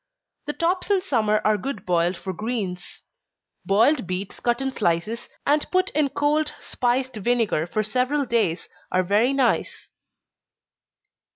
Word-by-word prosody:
The 295 Hz, -, -1 dB
tops 360 Hz, +4 st, 0 dB
in 400 Hz, -2 st, +4 dB
summer 215 Hz, -, +1 dB
are 215 Hz, -1 st, +3 dB
good 265 Hz, -1 st, -5 dB
boiled 175 Hz, 0 st, +1 dB
for 190 Hz, -, -5 dB
greens. 200 Hz, -3 st, -4 dB, 0.6 s
Boiled 225 Hz, -, +3 dB
beets 185 Hz, +2 st, -4 dB
cut 240 Hz, 0 st, 0 dB
in 270 Hz, 0 st, -1 dB
slices, 210 Hz, +1 st, -1 dB, 0.2 s
and 295 Hz, +1 st, +2 dB
put 370 Hz, 0 st, +1 dB
in 295 Hz, -1 st, +1 dB
cold 300 Hz, +2 st, +1 dB
spiced 255 Hz, +1 st, -1 dB
vinegar 215 Hz, -7 st, +1 dB
for 215 Hz, +5 st, -1 dB
several 255 Hz, +6 st, 0 dB
days, 225 Hz, -8 st, 0 dB, 0.2 s
are 185 Hz, 0 st, +2 dB
very 210 Hz, +7 st, +3 dB
nice. 270 Hz, -4 st, 0 dB
235 Hz, 135 wpm, -24 LUFS, 195-275 Hz, 0.6 s, in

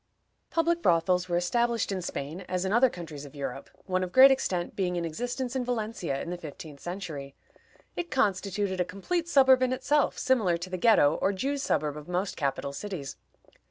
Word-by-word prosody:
Public 340 Hz, +1 st, +1 dB
brothels 180 Hz, -, +2 dB
were 175 Hz, -, +1 dB
established 235 Hz, +5 st, +1 dB
in 190 Hz, -1 st, -2 dB
Spain, 160 Hz, 0 st, -5 dB
as 185 Hz, 0 st, -1 dB
in 190 Hz, -, 0 dB
other 245 Hz, +3 st, +5 dB
countries 160 Hz, -7 st, -8 dB
of 145 Hz, 0 st, -12 dB
Europe, 135 Hz, -1 st, -5 dB, 0.2 s
one 185 Hz, -1 st, 0 dB
of 180 Hz, -, -4 dB
great 265 Hz, +4 st, +9 dB
extent 180 Hz, -10 st, -1 dB
being 180 Hz, -2 st, -1 dB
in 170 Hz, -1 st, -1 dB
existence 245 Hz, -, -3 dB
in 260 Hz, -, 0 dB
Valencia 220 Hz, -, -2 dB
in 170 Hz, -, -6 dB
the 180 Hz, -, -5 dB
fifteenth 150 Hz, -2 st, -9 dB
century. 155 Hz, -7 st, -6 dB, 0.6 s
It 345 Hz, -1 st, -4 dB
constituted 195 Hz, -4 st, 0 dB
a -, -, +4 dB
complete 330 Hz, -, -3 dB
suburb 265 Hz, -4 st, +6 dB
in 255 Hz, 0 st, +2 dB
itself, 275 Hz, +3 st, +1 dB
similar 215 Hz, -10 st, +2 dB
to 180 Hz, +2 st, -7 dB
the 185 Hz, -, -2 dB
Ghetto, 175 Hz, -8 st, +4 dB
or 195 Hz, -, +3 dB
Jews' 275 Hz, +8 st, -2 dB
suburb 150 Hz, -, 0 dB
of 150 Hz, +1 st, -10 dB
most 180 Hz, +2 st, -2 dB
capital 140 Hz, -1 st, -2 dB
cities. 175 Hz, -5 st, -6 dB
185 Hz, 190 wpm, -28 LUFS, 170-245 Hz, 0.6 s, great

